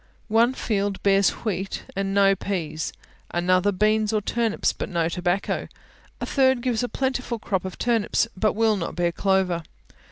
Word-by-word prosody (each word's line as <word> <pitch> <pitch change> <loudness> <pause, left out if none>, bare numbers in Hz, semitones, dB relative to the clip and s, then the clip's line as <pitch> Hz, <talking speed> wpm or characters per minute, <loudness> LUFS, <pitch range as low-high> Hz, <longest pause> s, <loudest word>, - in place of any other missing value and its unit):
One 230 +3 +4
field 200 -4 -1
bears 195 -1 +4 0.2
wheat, 195 -2 -2
and 195 0 -1
no 195 0 +4
peas; 160 -6 -3 0.4
another 185 +3 +2
beans 215 +2 +2
or 215 - +2
turnips, 225 +1 0
but - - -5
no 170 -2 0
tobacco; 180 +2 -1 0.5
a - - -3
third 260 -3 +3
gives 245 -3 0
a 245 - -2
plentiful 260 -3 -2
crop 190 -4 -2
of 185 - -6
turnips, 230 -1 +1
but 215 +3 +1
will 220 -1 +2
not 170 - -4
bear 175 -1 +1
clover. 190 -1 +1
200 Hz, 160 wpm, -24 LUFS, 185-225 Hz, 0.5 s, One